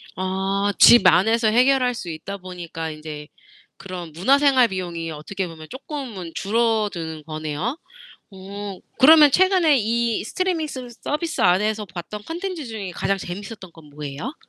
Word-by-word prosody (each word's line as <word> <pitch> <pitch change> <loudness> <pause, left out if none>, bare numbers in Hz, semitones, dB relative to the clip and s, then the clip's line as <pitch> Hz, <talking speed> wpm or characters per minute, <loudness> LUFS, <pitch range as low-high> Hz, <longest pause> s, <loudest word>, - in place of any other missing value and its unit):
아. 190 +2 -1
집 235 -5 +8
안에서 225 +5 +4
해결할 250 +2 +3
수 180 -7 -7
있다 165 +5 -6
보니까 175 -3 -7
인제 155 -1 -8 0.5
그런 180 -4 -8
문화생활 260 - +4
비용이 170 -4 -5
어떻게 180 +5 -5
보면 160 -1 -11
쪼끔은 260 - -7
줄어드는 205 -8 -1
거네요. 155 - -4 0.5
어 195 0 -8 0.2
그러면 300 +1 +8
최근에 360 -4 +4
이 230 0 0
스트리밍 350 +3 -1
스 255 -4 -7
서비스 320 +3 -2
안에서 210 +4 +2
봤던 190 +3 -8
컨텐츠 345 -2 -5
중에 215 -5 -6
가장 195 +3 -1
재미있었던 190 +1 -8
건 165 -2 -16
뭐예요? 150 - -6
200 Hz, 320 characters per minute, -22 LUFS, 175-250 Hz, 0.5 s, 집